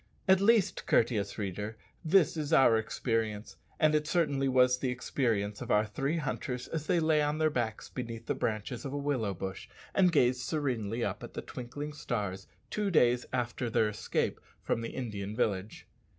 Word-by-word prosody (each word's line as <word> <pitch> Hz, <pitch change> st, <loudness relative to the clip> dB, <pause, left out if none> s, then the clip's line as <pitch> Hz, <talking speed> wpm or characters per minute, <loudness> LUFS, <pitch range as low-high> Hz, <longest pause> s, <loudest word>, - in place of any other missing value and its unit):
At 190 Hz, 0 st, +5 dB
least, 215 Hz, -1 st, +3 dB
courteous 105 Hz, -4 st, +2 dB
reader, 105 Hz, +1 st, -4 dB, 0.3 s
this 170 Hz, 0 st, +4 dB
is 155 Hz, -1 st, -3 dB
our 135 Hz, -7 st, +6 dB
experience; 110 Hz, -1 st, -2 dB, 0.2 s
and 155 Hz, -1 st, +4 dB
certainly 145 Hz, -5 st, +1 dB
this 130 Hz, -, 0 dB
was 125 Hz, 0 st, +5 dB
the 130 Hz, -, -1 dB
experience 115 Hz, -5 st, -1 dB
of -, -, -6 dB
our 105 Hz, +1 st, +4 dB
three 135 Hz, +9 st, -2 dB
hunters 125 Hz, -5 st, -3 dB
as 155 Hz, -2 st, -4 dB
they 175 Hz, -, +3 dB
lay 155 Hz, -1 st, +3 dB
on 150 Hz, +1 st, 0 dB
their 155 Hz, 0 st, +2 dB
backs 115 Hz, -5 st, -2 dB
beneath 115 Hz, -2 st, -6 dB
the -, -, 0 dB
branches 110 Hz, +2 st, -3 dB
of 135 Hz, -, -5 dB
a -, -, -2 dB
willow 130 Hz, -9 st, -1 dB
bush 95 Hz, +2 st, -6 dB, 0.2 s
and 185 Hz, -2 st, +4 dB
gazed 125 Hz, -5 st, +3 dB
serenely 120 Hz, -7 st, -1 dB
up -, -, -3 dB
at -, -, -9 dB
the -, -, -4 dB
twinkling 145 Hz, +5 st, -6 dB
stars 100 Hz, -9 st, -3 dB, 0.2 s
two 210 Hz, -1 st, 0 dB
days 125 Hz, -8 st, +3 dB
after 120 Hz, -1 st, -2 dB
their 110 Hz, -1 st, +2 dB
escape 105 Hz, -1 st, -2 dB, 0.2 s
from 115 Hz, -, 0 dB
the 115 Hz, -, -4 dB
Indian 105 Hz, -5 st, -5 dB
village. 105 Hz, -3 st, -2 dB
125 Hz, 180 wpm, -31 LUFS, 110-150 Hz, 0.3 s, our